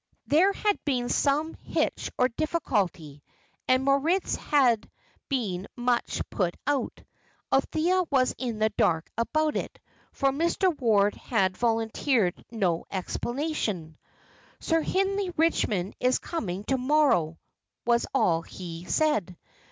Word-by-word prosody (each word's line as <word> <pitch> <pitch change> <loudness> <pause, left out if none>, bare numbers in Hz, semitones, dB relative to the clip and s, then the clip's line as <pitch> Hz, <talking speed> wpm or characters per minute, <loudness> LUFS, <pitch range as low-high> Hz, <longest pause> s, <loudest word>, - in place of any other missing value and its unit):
There 350 +7 +4
had 410 +1 -1
been 250 -4 -1
some 300 +3 +1
hitch - - -2
or 250 - +4
difficulty, 205 - -2 0.5
and 255 +1 +3
Moritz 300 +7 +2
had 250 -7 +2 0.4
been 205 -9 -2
much 245 -1 0
put 180 -5 -1
out. 280 -2 -1 0.5
Althea 325 +7 +2
was 260 -3 +2
in 240 -4 -3
the 215 0 +2
dark 160 -1 +1
about 305 +7 0
it, - - -4 0.3
for 275 0 +1
Mr. 340 +4 +1
Ward 210 -6 +3
had 190 -6 0
volunteered 225 -2 0
no 185 -7 -1
explanation. 210 - -3 0.6
"Sir 325 0 +1
Hindley 390 +3 0
Richmond 215 - +1
is 250 +1 +2
coming 200 - -4
to 265 +4 0
morrow," 255 - +2 0.5
was 235 0 +2
all 170 -11 +2
he 170 -1 -8
said. 210 - 0
250 Hz, 120 wpm, -27 LUFS, 195-305 Hz, 0.6 s, There